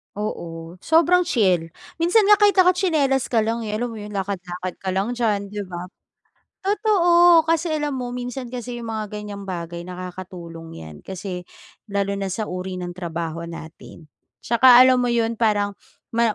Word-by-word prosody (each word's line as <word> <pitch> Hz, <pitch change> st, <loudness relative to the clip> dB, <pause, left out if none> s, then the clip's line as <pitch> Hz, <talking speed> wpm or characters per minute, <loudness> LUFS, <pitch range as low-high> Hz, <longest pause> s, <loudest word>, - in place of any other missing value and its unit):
Oo. 170 Hz, -4 st, -6 dB
Sobrang 345 Hz, -, +4 dB
chill. 185 Hz, -, +2 dB, 0.3 s
Minsan 360 Hz, +6 st, +4 dB
nga 415 Hz, 0 st, +7 dB
kahit 410 Hz, -2 st, +5 dB
naka 365 Hz, -1 st, +6 dB
tsinelas 305 Hz, -8 st, +1 dB
ka 225 Hz, -3 st, +2 dB
lang, 230 Hz, +1 st, -2 dB
eh, 210 Hz, -, -2 dB
alam 240 Hz, +2 st, -2 dB
mo 225 Hz, -, -8 dB
yun? 210 Hz, 0 st, -8 dB
Lakad-lakad 185 Hz, -2 st, -4 dB
ka 190 Hz, -, -4 dB
lang 195 Hz, +5 st, 0 dB
diyan, 210 Hz, -5 st, -1 dB
'di 210 Hz, -, -4 dB
ba? 175 Hz, -1 st, -6 dB, 0.8 s
Totoo. 350 Hz, -5 st, +5 dB
Kasi 330 Hz, 0 st, +1 dB
alam 295 Hz, -1 st, -2 dB
mo 250 Hz, -1 st, -4 dB
minsan 250 Hz, 0 st, -5 dB
kasi 245 Hz, -1 st, -5 dB
yung 230 Hz, -, -7 dB
mga 215 Hz, -1 st, -4 dB
gan'yang 205 Hz, -1 st, -7 dB
bagay 170 Hz, -1 st, -5 dB
nakakatulong 180 Hz, -, -8 dB
yan, 80 Hz, -2 st, -10 dB
kasi 185 Hz, -1 st, -6 dB, 0.4 s
lalo 200 Hz, 0 st, -1 dB
na 195 Hz, -1 st, -3 dB
sa 215 Hz, +4 st, -2 dB
uri 185 Hz, +1 st, -5 dB
ng 175 Hz, 0 st, -5 dB
trabaho 170 Hz, -2 st, -5 dB
natin, 160 Hz, -1 st, -11 dB, 0.4 s
'Tsaka 245 Hz, +1 st, +7 dB
alam 255 Hz, -1 st, +4 dB
mo 245 Hz, -, +1 dB
yun, 230 Hz, -1 st, +1 dB
parang 205 Hz, -2 st, +2 dB, 0.4 s
ma 230 Hz, -1 st, +3 dB
210 Hz, 170 wpm, -22 LUFS, 180-255 Hz, 0.8 s, nga